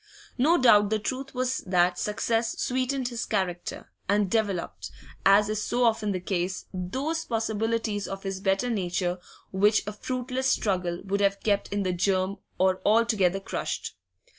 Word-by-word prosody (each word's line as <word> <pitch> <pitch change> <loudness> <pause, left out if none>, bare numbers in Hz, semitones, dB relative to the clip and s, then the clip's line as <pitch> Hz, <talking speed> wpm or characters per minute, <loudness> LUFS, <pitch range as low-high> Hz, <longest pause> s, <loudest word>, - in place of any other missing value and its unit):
No 320 +7 +5
doubt 210 -6 +6
the 220 - +2
truth 260 +5 -4
was 255 +1 0
that 180 -1 +2
success 225 +2 -1
sweetened 255 0 0
his 235 -2 -4
character, 185 -4 -3 0.2
and 200 -2 +2
developed, 205 -6 -1 0.4
as 200 +1 +6
is 215 0 -1
so 245 +3 0
often 220 -3 +2
the 185 - -1
case, 180 0 -2
those 265 - -2
possibilities 225 -2 -1
of 195 0 -6
his 195 -1 -3
better 195 +6 +1
nature 180 -3 -1 0.3
which 205 +3 +3
a 210 - -4
fruitless 255 +4 -2
struggle 180 -4 -1
would 200 +1 -1
have 200 0 +1
kept 205 -2 +1
in 200 0 0
the 185 -1 0
germ 185 +2 0 0.2
or 185 0 +2
altogether 210 -4 +3
crushed. 195 - -4
205 Hz, 155 wpm, -27 LUFS, 190-230 Hz, 0.4 s, doubt